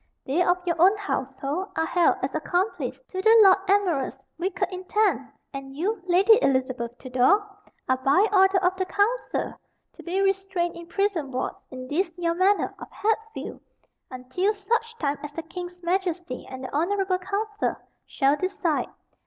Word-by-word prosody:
They 290 +7 +1
of 355 0 +3
your 340 -2 0
own 390 +4 +6
household 285 -2 -3
are 320 - +1
held 345 +1 +3
as 265 - -1
accomplice 355 +6 -1
to 375 - -3
the 445 +3 +6
Lord 380 -2 +7
Admiral's 360 -10 +1 0.2
wicked 360 0 -1
intent, 370 -6 0 0.2
and 270 0 -7
you, 395 +5 -1
Lady 395 +6 +6
Elizabeth 255 - 0
Tudor, 255 +11 +3 0.4
are 260 - +2
by 275 +10 +3
order 385 0 +5
of 360 +1 +2
the 375 - 0
council 435 +7 0 0.4
to - - -13
be 360 +3 -2
restrained 390 -3 0
in 340 0 -10
prison 370 -6 -1
wards 255 -1 -4
in 255 -1 -8
this 340 +7 0
your 340 -1 0
manor 380 +4 +2
of - - -9
Hatfield 445 +1 -3 0.5
until 255 +12 -1
such 460 +3 -2
time 285 -5 -1
as 295 0 -7
the 330 - -5
king's 355 +2 -8
Majesty 350 -5 -2
and 260 0 -8
the 255 - -6
honorable 370 +3 +1
council 420 +3 -2 0.3
shall 275 0 +2
decide. 350 -2 -1
360 Hz, 160 wpm, -25 LUFS, 285-395 Hz, 0.5 s, Lord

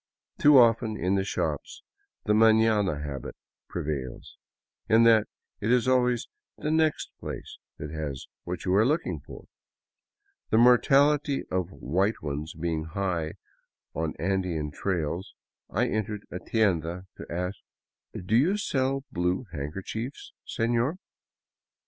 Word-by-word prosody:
Too 145 -1 +7
often, 115 -2 +4
in 90 +3 0
the 95 -1 +2
shops, 75 -6 -3 0.4
the 105 - +3
maiiana 110 -7 +4
habit 70 -4 -6 0.3
prevails, 70 -4 -4 0.3
— - - -45
in 115 +1 +6
that 115 -2 +5 0.3
it 110 - 0
is 125 -1 +3
always 125 -2 +2 0.3
the 150 - -2
next 160 -1 +1
place - - -7 0.2
that 75 0 -6
has 75 -4 -4 0.2
what 90 0 -5
you 90 - +1
are 100 +3 +5
looking 150 +7 0
for. - - -12 1.0
The - - +3
mortality 140 +4 +4
of 90 -2 0
white 95 +5 0
ones 75 +2 -4
being 80 -1 -2
high 85 -3 -2 0.6
on 80 0 -2
Andean 90 -4 -1
trails, 85 +1 -3 0.3
I - - +1
entered 105 -1 -3
a 90 - -4
tienda 90 -5 0
to - - -9
ask: 90 +3 -3 0.3
" 90 - -11
Do 110 - +1
you 165 - +4
sell 135 -8 0
blue 90 +6 0
handkerchiefs, 95 - -5
seiior? 120 +6 0
100 Hz, 130 wpm, -27 LUFS, 80-120 Hz, 1.0 s, Too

